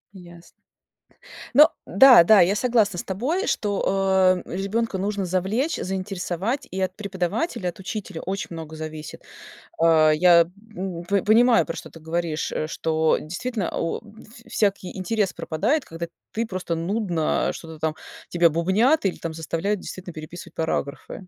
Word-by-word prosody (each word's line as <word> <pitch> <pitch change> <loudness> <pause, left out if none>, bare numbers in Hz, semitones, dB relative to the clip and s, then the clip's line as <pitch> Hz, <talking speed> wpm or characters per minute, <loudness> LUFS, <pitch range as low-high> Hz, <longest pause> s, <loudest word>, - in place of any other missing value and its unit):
Ясно. 175 -2 -14 1.0
Но 300 +3 +8
да, 245 -1 +8
да, 210 +3 +7
я 185 +4 +3
согласна 220 -5 +2
с - - -3
тобой, 270 - -2
что, 190 -2 +2
э, - - -7
ребёнка 200 +2 -1
нужно 200 0 -2
завлечь, 195 - 0
заинтересовать 190 - -3
и 190 +1 -3
от 185 0 -1
преподавателя, 190 - -2
от 175 - -11
учителя, 190 -3 -6
очень 195 +2 -3
много 160 -1 -7
зависит. 155 -1 -7 0.6
Э, 160 -2 +5
я, 170 +1 +6 0.3
м, 180 -2 -4
п 200 +1 +1
понимаю, 230 +2 +5
про 165 - -4
что - - -8
ты 165 - -13
говоришь, 160 0 -3
что 160 0 +1
действительно, 200 +5 -4
у 165 - -1
в 220 +2 -16
всякий 200 -3 -1
интерес 195 0 0
пропадает, 230 - -1
когда 165 +1 -6 0.3
ты 230 +1 -1
просто 185 -4 -3
нудно 175 -2 0
что-то 160 -1 -10
там 160 -1 -1 0.3
тебя 170 -1 +4
бубнят 200 - +2
или 190 - 0
там 165 -1 -6
заставляют, 165 +5 -2
действительно, 180 -2 -8
переписывать 155 +3 -9
параграфы. 160 -3 -3
185 Hz, 145 wpm, -24 LUFS, 170-210 Hz, 1.0 s, Но